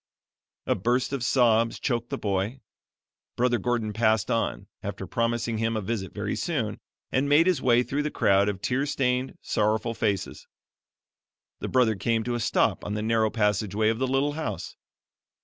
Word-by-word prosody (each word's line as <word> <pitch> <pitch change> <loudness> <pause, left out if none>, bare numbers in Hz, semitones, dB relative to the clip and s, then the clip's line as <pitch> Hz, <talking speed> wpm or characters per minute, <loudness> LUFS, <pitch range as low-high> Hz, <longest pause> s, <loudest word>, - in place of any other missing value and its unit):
A - - +2
burst 125 +7 0
of 135 -4 -2
sobs 115 -2 +3
choked 120 -2 -1
the - - -3
boy; 100 +5 -2 0.8
Brother 120 -1 +2
Gordon 115 -1 -1
passed 110 -2 +2
on, 65 - -1 0.2
after - - -5
promising 115 -1 -1
him 115 0 0
a - - 0
visit 95 -2 -3
very 105 0 -3
soon, 120 - -2 0.3
and 135 +2 +1
made 150 +3 +6
his 180 -7 +2
way 120 -1 +4
through 140 +3 -2
the 150 - -1
crowd 100 -6 +3
of 95 -1 -5
tear 135 +3 0
stained, 130 -2 -1
sorrowful 110 +2 0
faces. 105 -4 -2 1.1
The - - -4
Brother 125 -4 +3
came 115 +3 0
to 120 - -2
a 120 - -1
stop 110 - +1
on 105 - -3
the 105 - -2
narrow 110 0 +2
passageway 105 -1 +1
of 115 +1 -1
the 130 - +1
little 135 +3 +1
house. 160 +1 -5
115 Hz, 170 wpm, -26 LUFS, 105-125 Hz, 1.1 s, made